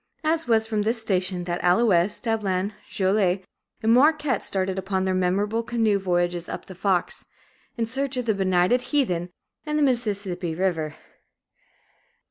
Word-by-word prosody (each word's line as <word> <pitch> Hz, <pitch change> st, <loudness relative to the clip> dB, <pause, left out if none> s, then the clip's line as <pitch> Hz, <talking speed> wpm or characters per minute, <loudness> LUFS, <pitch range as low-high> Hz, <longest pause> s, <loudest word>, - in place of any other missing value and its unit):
It 320 Hz, -1 st, 0 dB
was 220 Hz, -2 st, +3 dB
from 220 Hz, -2 st, -1 dB
this 225 Hz, +3 st, 0 dB
station 185 Hz, -4 st, -1 dB
that 175 Hz, 0 st, -3 dB
Allouez, 180 Hz, 0 st, +3 dB
Dablon, 205 Hz, -3 st, -1 dB, 0.2 s
Joliet, 190 Hz, -1 st, +1 dB, 0.4 s
and 225 Hz, +1 st, +4 dB
Marquette 295 Hz, -2 st, +3 dB
started 190 Hz, 0 st, -1 dB
upon 190 Hz, 0 st, -1 dB
their 190 Hz, -, +1 dB
memorable 195 Hz, +5 st, +1 dB
canoe 225 Hz, -3 st, +1 dB
voyages 175 Hz, -2 st, -1 dB
up -, -, -6 dB
the 190 Hz, -, -10 dB
Fox, 185 Hz, -1 st, -1 dB, 0.5 s
in 230 Hz, -, 0 dB
search 265 Hz, +3 st, -2 dB
of 250 Hz, -, -2 dB
benighted 195 Hz, +2 st, +2 dB
heathen 240 Hz, -, 0 dB, 0.3 s
and 300 Hz, -1 st, -2 dB
the 300 Hz, -, +3 dB
Mississippi 200 Hz, -, -1 dB
River. 165 Hz, -4 st, -1 dB
200 Hz, 140 wpm, -24 LUFS, 185-230 Hz, 0.5 s, and